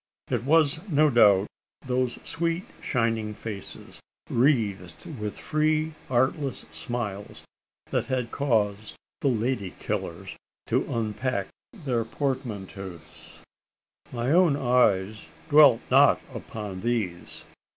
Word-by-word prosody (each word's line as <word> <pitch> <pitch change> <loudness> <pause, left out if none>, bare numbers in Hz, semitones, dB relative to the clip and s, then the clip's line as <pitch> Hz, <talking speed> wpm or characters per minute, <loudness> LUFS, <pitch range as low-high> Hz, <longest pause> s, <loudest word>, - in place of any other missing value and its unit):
It - - -1
was, 160 +4 +3
no 150 -1 +4
doubt, 100 -5 +6 0.4
those 125 -1 0
sweet 165 +2 -2 0.2
shining 115 -3 -1
faces, 105 -2 -8 0.3
wreathed 110 - +1
with 105 -1 -4
free 155 +1 0 0.2
artless 130 +2 0
smiles, 105 -5 -5 0.5
that - - 0
had 125 -3 -2
caused 110 -6 0 0.2
the - - 0
lady 115 -5 -1
killers - - -4 0.3
to - - 0
unpack 110 -2 -2 0.2
their 130 - -2
portmanteaus. 100 - -5 0.7
My 120 +2 -1
own 170 -3 +5
eyes 110 -6 +2 0.2
dwelt 145 -6 +7
not - - +6
upon 105 -4 -6
these. 110 -8 -3
120 Hz, 100 wpm, -26 LUFS, 105-140 Hz, 0.7 s, dwelt